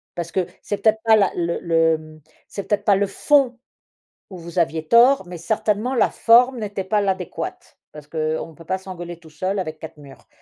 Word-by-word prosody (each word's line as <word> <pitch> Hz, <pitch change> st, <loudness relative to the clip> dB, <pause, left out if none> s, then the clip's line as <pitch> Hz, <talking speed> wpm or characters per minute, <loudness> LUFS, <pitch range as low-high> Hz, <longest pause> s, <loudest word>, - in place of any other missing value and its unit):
Parce 170 Hz, -1 st, -5 dB
que 185 Hz, -2 st, 0 dB, 0.2 s
c'est 205 Hz, -, -3 dB
peut-être 220 Hz, +1 st, +2 dB
pas 225 Hz, -1 st, +6 dB
la 200 Hz, -4 st, +3 dB
le 170 Hz, -1 st, -1 dB
le 160 Hz, -2 st, 0 dB, 0.3 s
c'est 200 Hz, -, -7 dB
peut-être 205 Hz, -1 st, 0 dB
pas 200 Hz, -, +5 dB
le 200 Hz, +1 st, +1 dB
fond 265 Hz, +3 st, +2 dB, 0.7 s
où 190 Hz, -, -10 dB
vous 170 Hz, +1 st, -8 dB
aviez 160 Hz, -2 st, 0 dB
tort, 245 Hz, -, +5 dB
mais 175 Hz, -1 st, -8 dB
certainement 215 Hz, +6 st, -1 dB
la 240 Hz, -, +3 dB
forme 245 Hz, +2 st, +4 dB
n'était 205 Hz, -3 st, -4 dB
pas 210 Hz, +2 st, +1 dB
l'adéquate, 190 Hz, -3 st, -4 dB
parce 150 Hz, -1 st, -12 dB
qu'on 155 Hz, +1 st, -3 dB
peut 165 Hz, +1 st, -15 dB
pas 190 Hz, -, 0 dB
s'engueuler 175 Hz, -3 st, -8 dB
tout 165 Hz, -2 st, -17 dB
seul 185 Hz, +6 st, -3 dB
avec 155 Hz, -4 st, -4 dB
4 160 Hz, -, -10 dB
murs. 140 Hz, -2 st, -15 dB
185 Hz, 195 wpm, -21 LUFS, 165-210 Hz, 0.7 s, pas